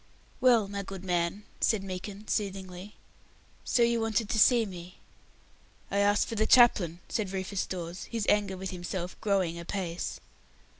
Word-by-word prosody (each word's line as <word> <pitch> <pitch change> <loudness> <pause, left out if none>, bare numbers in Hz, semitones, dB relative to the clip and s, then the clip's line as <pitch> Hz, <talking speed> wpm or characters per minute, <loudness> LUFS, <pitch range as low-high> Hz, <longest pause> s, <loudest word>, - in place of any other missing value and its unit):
"Well, 240 -5 +4
my 200 0 -4
good 195 -1 -8
man," 175 +3 0 0.2
said 215 -4 +2
Meekin, 195 +2 -7
soothingly, 190 -1 -4 0.7
"so 240 - +2
you 235 0 +2
wanted 225 -1 0
to 220 - +1
see 235 +1 +6
me." 180 -2 -9 0.9
"I 200 - +1
asked 205 0 +3
for - - -5
the 220 0 +1
chaplain," 180 -9 +5
said 205 -4 -2
Rufus 190 0 -3
Dawes, 175 0 -5
his 230 -3 -3
anger 205 -2 +2
with 190 0 -5
himself 180 0 -5
growing 185 -5 0
apace. 175 0 -4
195 Hz, 150 wpm, -29 LUFS, 180-215 Hz, 0.9 s, see